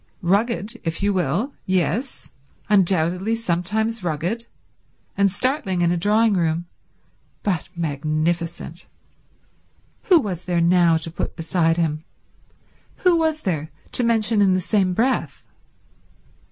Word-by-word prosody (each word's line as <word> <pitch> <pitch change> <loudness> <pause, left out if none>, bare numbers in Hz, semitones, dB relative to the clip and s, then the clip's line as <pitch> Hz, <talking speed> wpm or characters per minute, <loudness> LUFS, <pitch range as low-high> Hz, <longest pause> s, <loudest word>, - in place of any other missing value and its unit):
Rugged, 220 +4 0
if 165 +3 -3
you 205 0 +2
will—yes, 190 - -1 0.4
undoubtedly 185 +1 +2
sometimes 220 +2 -1
rugged, 175 +9 -2 0.7
and 200 0 +3
startling 200 - -1
in 170 0 +3
a - - +1
drawing 210 +5 +3
room, 170 -2 0 0.8
but 180 -6 -1
magnificent. 165 +2 -2 1.2
Who 360 -4 +6
was 185 - -4
there 175 -1 0
now 170 -1 +4
to 160 +1 -5
put - - -4
beside 165 -1 +1
him? 155 -2 -1 1.0
Who 360 -1 +6
was 320 -2 0
there 155 -6 -2 0.2
to 250 - 0
mention 225 -2 +2
in 190 -2 +4
the - - +1
same 185 -1 +1
breath? 255 +5 0
185 Hz, 115 wpm, -22 LUFS, 170-220 Hz, 1.2 s, Who